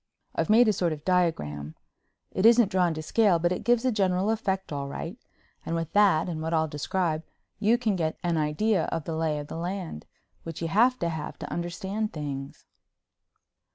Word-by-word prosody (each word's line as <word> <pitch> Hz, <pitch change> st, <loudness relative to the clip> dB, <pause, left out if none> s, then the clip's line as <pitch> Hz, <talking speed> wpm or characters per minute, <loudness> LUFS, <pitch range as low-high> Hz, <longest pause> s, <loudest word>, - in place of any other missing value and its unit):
I've -, -, -1 dB
made 230 Hz, +2 st, +6 dB
a 215 Hz, -, +4 dB
sort 175 Hz, -4 st, 0 dB
of 150 Hz, 0 st, -10 dB
diagram—it 160 Hz, -, -3 dB
isn't 230 Hz, -2 st, +6 dB
drawn 180 Hz, -4 st, +2 dB
to 155 Hz, -, -5 dB
scale 205 Hz, 0 st, +3 dB
but 175 Hz, +1 st, +1 dB
it 180 Hz, -, -2 dB
gives 240 Hz, -1 st, +3 dB
the 260 Hz, -, +2 dB
general 195 Hz, -1 st, +1 dB
effect, 195 Hz, -6 st, -2 dB
all 140 Hz, -1 st, -3 dB
right—and 165 Hz, -, -8 dB
with 165 Hz, -1 st, -3 dB
that 200 Hz, -6 st, +4 dB
and 160 Hz, -3 st, -4 dB
what 160 Hz, +1 st, -1 dB
I'll 160 Hz, 0 st, +2 dB
describe 155 Hz, +2 st, -1 dB, 0.4 s
you 220 Hz, +3 st, +4 dB
can 225 Hz, -5 st, 0 dB
get 160 Hz, -3 st, -1 dB
an 175 Hz, -1 st, +1 dB
idea 160 Hz, +8 st, +1 dB
of 165 Hz, -, -3 dB
the 160 Hz, +2 st, -4 dB
lay 160 Hz, -1 st, 0 dB
of 145 Hz, -, -5 dB
the 155 Hz, -, -7 dB
land, 175 Hz, -, -5 dB, 0.3 s
which 165 Hz, -2 st, -7 dB
you 165 Hz, -, -2 dB
have 240 Hz, +8 st, +4 dB
to 170 Hz, -, +1 dB
have 160 Hz, -2 st, -5 dB
to -, -, -7 dB
understand 190 Hz, +5 st, -3 dB
things. 140 Hz, -3 st, -6 dB
175 Hz, 190 wpm, -27 LUFS, 155-205 Hz, 0.4 s, made